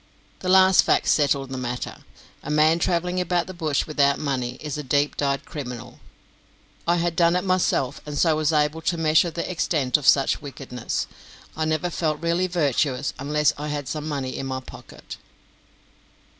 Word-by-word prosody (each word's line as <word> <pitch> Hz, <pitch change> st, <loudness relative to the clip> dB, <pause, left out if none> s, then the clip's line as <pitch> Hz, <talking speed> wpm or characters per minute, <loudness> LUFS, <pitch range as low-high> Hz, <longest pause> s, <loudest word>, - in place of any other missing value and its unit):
That 185 Hz, -, -3 dB
last 190 Hz, 0 st, +6 dB
fact -, -, +2 dB
settled 140 Hz, -3 st, +2 dB
the 130 Hz, -, -4 dB
matter. 125 Hz, 0 st, -4 dB, 0.4 s
A -, -, -8 dB
man 155 Hz, +2 st, +4 dB
travelling 180 Hz, +1 st, 0 dB
about 175 Hz, -1 st, 0 dB
the 185 Hz, -, -8 dB
bush 155 Hz, -5 st, -1 dB
without 140 Hz, -2 st, +2 dB
money 130 Hz, -4 st, -2 dB
is 150 Hz, -2 st, -5 dB
a 150 Hz, -, -3 dB
deep 145 Hz, +1 st, +1 dB
dyed 140 Hz, -1 st, -1 dB
criminal. 125 Hz, -5 st, -7 dB, 0.9 s
I 170 Hz, -, +4 dB
had 170 Hz, -1 st, -1 dB
done 170 Hz, 0 st, +3 dB
it 180 Hz, -, 0 dB
myself, 185 Hz, -8 st, 0 dB
and 150 Hz, -1 st, -6 dB
so 160 Hz, 0 st, +3 dB
was 155 Hz, 0 st, +1 dB
able 150 Hz, +1 st, +1 dB
to 170 Hz, +1 st, -1 dB
measure 160 Hz, +1 st, +3 dB
the 170 Hz, +1 st, -4 dB
extent 155 Hz, -7 st, +1 dB
of 145 Hz, -, -4 dB
such 135 Hz, -1 st, +4 dB
wickedness. 130 Hz, -4 st, -4 dB, 0.5 s
I 155 Hz, -, -1 dB
never 160 Hz, +3 st, -1 dB
felt 155 Hz, -2 st, -1 dB
really 170 Hz, +3 st, 0 dB
virtuous 145 Hz, -6 st, 0 dB
unless 150 Hz, +1 st, +1 dB
I 150 Hz, -, -4 dB
had 145 Hz, -2 st, -4 dB
some 150 Hz, +3 st, -4 dB
money 135 Hz, -3 st, -3 dB
in 135 Hz, -, -4 dB
my 130 Hz, 0 st, -3 dB
pocket. -, -, -11 dB
150 Hz, 175 wpm, -24 LUFS, 140-170 Hz, 0.9 s, last